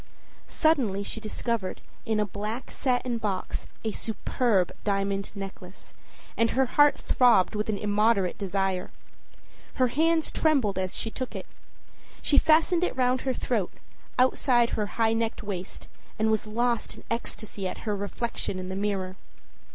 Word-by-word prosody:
â - - -29
Suddenly 245 -11 +2
she 225 - -3
discovered, 220 -2 -2 0.3
in 220 -1 +1
a 210 - +2
black 210 +5 -5
satin 250 -2 0
box, 200 -4 -3 0.2
a 220 - -1
superb 215 -2 0
diamond 195 -1 0
necklace, 195 -1 -9 0.4
and 230 0 +3
her 265 0 +2
heart 290 +3 +4
throbbed 240 -7 +4
with 210 +1 -2
an 210 - 0
immoderate 205 -2 +2
desire. 195 -1 -1 0.9
Her 255 -1 +3
hands 320 +4 +2
trembled 260 - +2
as 185 0 -2
she 225 - -3
took 255 +1 -5
it. - - -5 0.7
She 285 - +4
fastened 325 +2 +4
it 360 - -1
round 255 0 +2
her 265 - 0
throat, 215 -8 -1 0.5
outside 250 -1 +3
her 210 -1 -1
high 225 -1 +3
necked 225 0 -1
waist, 190 -3 -5 0.3
and 220 0 +2
was 220 0 0
lost 235 +1 0
in - - -13
ecstasy 215 -4 -3
at - - -7
her 210 -2 0
reflection 205 0 -3
in 185 0 -5
the 190 - -3
mirror. 195 -2 -2
220 Hz, 150 wpm, -27 LUFS, 195-245 Hz, 0.9 s, heart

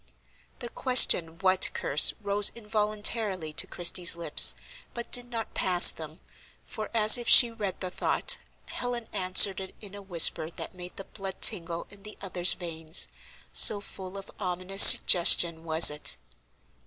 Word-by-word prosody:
The 240 - -10
question, 180 -11 +1
"What 185 -1 0
curse?" 140 - 0
rose 205 0 -1
involuntarily 210 -5 -5
to 155 - -2
Christie's 175 0 +1
lips, 170 0 +2 0.4
but 235 0 -10
did 245 0 0
not 230 -2 -9
pass 180 -1 +3
them, 155 +1 -15 0.4
for, 215 - -11
as 220 0 +4
if 240 - -7
she 240 -3 +5
read 210 -4 -9
the 185 -1 -8
thought, - - -3 0.3
Helen 245 -2 -8
answered 185 +1 +2
it 190 -1 -13
in 200 -2 -14
a 205 - -13
whisper 170 -4 +1
that 170 - -13
made 180 -1 -13
the 195 - -10
blood 195 -1 -12
tingle 170 -1 -1
in 200 -1 -18
the 210 +1 -14
other's 180 -2 -2
veins, 165 -1 -5 0.4
so 205 - +4
full 190 -1 -13
of 195 - -14
ominous 185 0 -3
suggestion 170 -2 +5
was 160 -1 +4
it. 150 - -3
190 Hz, 155 wpm, -24 LUFS, 175-210 Hz, 0.4 s, she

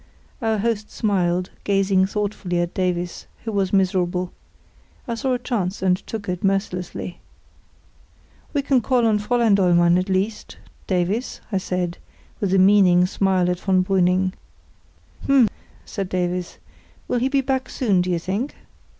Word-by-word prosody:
Our 220 -1 +1
host 215 0 -1
smiled, 180 -4 0
gazing 195 -1 +2
thoughtfully 200 -3 -2
at 175 0 -1
Davies, 180 -1 -2 0.2
who 225 - -3
was 195 -3 0
miserable. 180 -2 +1 0.8
I 235 - -2
saw 255 +3 -1
a - - +1
chance, 205 -7 -3
and 185 -1 +4
took 215 -3 -5
it 180 -1 -3
mercilessly. 185 -2 -2 1.3
"We 285 -2 0
can 270 -3 +3
call 245 +1 +2
on 215 -2 +3
Fräulein 230 0 +2
Dollmann, 175 -2 +4
at 185 +2 -3
least, 195 +3 -2 0.3
Davies," 190 +6 -1
I 195 - +1
said, 180 -2 -3 0.4
with 200 -3 -1
a 195 - +4
meaning 190 -2 +5
smile 190 -1 +1
at 180 0 -1
von 185 -1 +2
Brüning. 185 0 +2 0.9
"H'm!" 275 -4 +5 0.4
said 195 -2 -4
Davies; 180 -1 -2 0.5
"will 245 - 0
he 260 +3 +1
be 275 0 +2
back 265 0 -1
soon, 200 -8 +1
do 180 - -2
you 175 - +1
think?" 195 - -3
190 Hz, 150 wpm, -22 LUFS, 180-215 Hz, 1.3 s, meaning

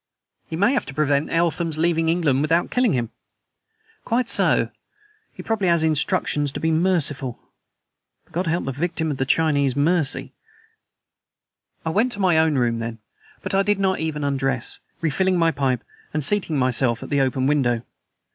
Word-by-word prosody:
"He 160 - -5
may 205 +10 +3
have 270 - -1
to 135 - -8
prevent 145 -1 +1
Eltham's 165 -1 0
leaving 165 0 +1
England 160 -6 +2
without 165 +3 +1
killing 250 -5 +2
him." 120 -3 -2 0.9
"Quite 235 +1 0
so. - - +2 0.6
He - - -10
probably 220 -4 -1
has 170 -2 +3
instructions 150 -2 +1
to - - -4
be 160 - 0
merciful. 155 -7 +1 0.9
But - - -28
God 180 +2 -1
help 170 +2 0
the 135 - -2
victim 160 +2 -2
of 135 -2 -2
Chinese 140 -4 +2
mercy!" 155 +1 +1 1.5
I 160 - 0
went 225 +9 +1
to 205 - -8
my 180 -5 +3
own 160 -2 +2
room 120 -2 +1
then. 115 0 -5 0.5
But - - -4
I 195 - +4
did 205 0 +1
not 190 -1 +1
even 155 -2 -3
undress, 135 -3 -2 0.2
refilling 180 +4 +1
my 165 -1 +3
pipe 130 -4 -1 0.3
and 155 - 0
seating 175 -2 +1
myself 125 -2 +1
at - - -9
the 140 -1 +2
open 130 0 0
window. 130 -5 +1
155 Hz, 165 wpm, -22 LUFS, 135-175 Hz, 1.5 s, I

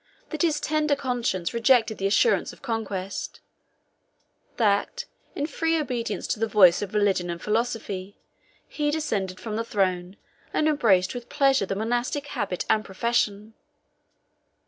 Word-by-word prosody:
that 310 - -3
his 320 -4 +2
tender 305 -1 +1
conscience 240 -10 -2
rejected 230 -2 +3
the 195 - +1
assurance 440 - +2
of - - -17
conquest; 205 -6 -4 1.2
that, 225 - +1 0.3
in 285 - -1
free 325 +2 0
obedience 245 -6 -3
to - - -2
the 225 - +1
voice 185 -5 +6
of 205 0 -5
religion 195 -4 +2
and 170 0 -4
philosophy, 210 -3 -2 0.5
he 295 -1 -1
descended 205 -12 -2
from 220 -2 -4
the 230 - -1
throne 185 -3 -1 0.4
and 310 - +2
embraced 205 -12 +3
with 245 -1 -8
pleasure 275 -8 +2
the 195 - -2
monastic 240 +6 -1
habit 180 - -3
and 215 - +2
profession. 215 0 -1
225 Hz, 140 wpm, -25 LUFS, 195-270 Hz, 1.2 s, voice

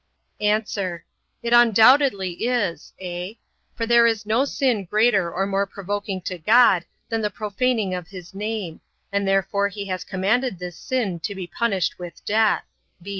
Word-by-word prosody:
A. 210 0 +3 0.9
It 235 0 0
undoubtedly 235 -3 +5
is, 220 -11 -1
(a) 180 +3 -6 0.4
for 230 - -2
there 235 0 +5
is 225 -2 -1
no 225 +6 +2
sin 255 -7 0
greater 200 -2 +2
or 195 +3 -1
more 200 0 0
provoking 200 0 -4
to 180 0 -5
God, 210 -1 +5 0.2
than 225 -1 -1
the 210 - 0
profaning 215 0 -1
of 180 -2 -5
his 185 -1 -11
name; 205 -4 -4 0.3
and 200 0 0
therefore 195 +1 +1
he 200 0 -6
has 185 -1 -3
commanded 200 +4 0
this 180 -1 -7
sin 225 -9 -2
to 200 +4 -4
be 190 -2 -5
punished 190 -1 -1
with 175 -2 -10
death. 220 +1 +2
200 Hz, 155 wpm, -23 LUFS, 185-230 Hz, 0.9 s, undoubtedly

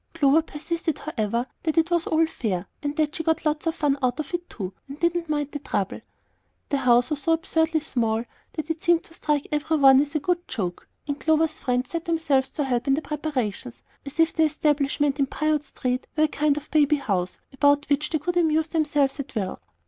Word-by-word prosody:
Clover 300 0 +4
persisted, 320 +1 -3
however, 235 -5 -2 0.2
that 315 -1 -1
it 325 +2 +3
was 340 -1 +1
all 320 +1 +3
fair, 205 - -3 0.2
and 290 0 -3
that 305 -1 +1
she - - -2
got 320 0 0
lots 305 +2 0
of 325 - 0
fun 285 -2 +1
out 250 +1 0
of 310 +3 -5
it 350 0 -3
too, 190 -3 -5
and 280 +2 -9
didn't 340 -1 0
mind 295 -1 -1
the 290 - -4
trouble. - - -2 0.7
The 285 - +1
house 245 +1 +3
was 295 -1 -1
so 325 +4 +2
absurdly 320 -1 +1
small 230 -5 -1 0.3
that 310 0 -3
it 325 - -4
seemed 340 -1 +3
to 330 - -16
strike 300 -3 -1
every 305 +1 +1
one 270 -1 +7
as 295 +2 -4
a - - +3
good 350 +3 -1
joke; 180 -5 -4 0.2
and 285 0 -3
Clover's 315 0 +2
friends 250 -1 -1
set 335 -1 -3
themselves 295 -6 +1
to 295 - -2
help 250 -1 -1
in 270 - +4
the 310 - -3
preparations, 255 - -3 0.2
as 280 +3 -10
if 325 0 +4
the 320 - 0
establishment 290 -1 +1
in 275 - +2
Piute 305 +1 0
Street 255 -1 -3
were 310 - +4
a - - +5
kind 295 -1 +1
of 300 0 -7
baby 300 -1 +4
house 195 -10 -2 0.2
about 285 +2 +3
which 290 +1 +1
they 315 - +1
could 350 +4 -2
amuse 320 -1 +2
themselves 295 -3 +1
at 270 -2 -6
will. 195 -4 -3
295 Hz, 215 wpm, -25 LUFS, 270-320 Hz, 0.7 s, one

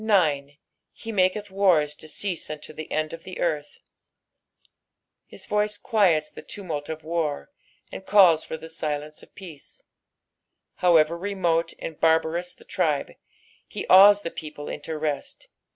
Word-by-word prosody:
9. 165 -10 +2 0.5
"Bt 225 - -7
mofatA 195 +1 +1
ttart 190 -7 +2
to 155 - -10
ceoMUTito 155 -4 -5
the 155 - -8
end 155 0 -1
of 165 - -9
the 185 - -9
earth." 150 -4 -2 1.5
His - - -9
voice 210 0 0
quiets 185 -10 +2
the - - -10
tumult 160 -8 -6
of 160 -1 -6
war, 155 - -2 0.4
and - - -8
calls 190 -5 +5
for 160 - -6
the 160 +1 -10
silence 150 -2 -4
of - - -19
peace. 170 -8 -12 0.9
However 165 -2 +4
remote 175 -3 -1
and 160 - -7
barbarous 165 +2 +2
the - - -18
tribe, - - -1 0.6
he - - -6
awes 205 +2 +8
the 170 - -4
people 150 -1 -8
into 155 +2 -5
rest. 150 -2 -4
165 Hz, 140 wpm, -25 LUFS, 155-190 Hz, 1.5 s, awes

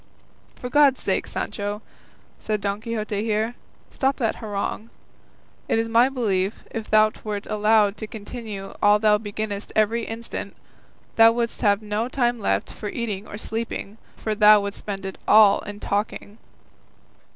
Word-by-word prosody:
"For 250 - -6
God's 280 0 +4
sake, - - -1
Sancho," 205 +1 -4 0.6
said 215 -1 -2
Don 200 +1 -2
Quixote 215 -2 -3
here, 220 +1 0 0.4
"stop 270 0 0
that 225 -5 -1
harangue; 210 +1 -4 0.8
it - - +2
is 225 0 0
my 235 +3 +4
belief, 205 -7 -1
if 225 -1 -5
thou 215 0 +5
wert 210 -1 -4
allowed 210 -1 +2
to 215 - -6
continue 210 -2 -7
all 205 0 +6
thou 210 0 +3
beginnest 205 -1 -5
every 225 +2 +2
instant, 230 +1 -6 0.6
thou 225 0 +8
wouldst 235 0 -2
have 205 -2 +2
no 210 +2 -1
time 245 -2 0
left 95 - -1
for 210 - -6
eating 215 -3 -4
or 205 - -7
sleeping; 225 -1 -5 0.2
for 215 - -2
thou 210 0 +7
wouldst 200 0 -5
spend 195 -2 -6
it 190 - -6
all 210 -2 +7
in 205 0 -8
talking." 205 +1 -3
215 Hz, 150 wpm, -23 LUFS, 205-230 Hz, 0.8 s, thou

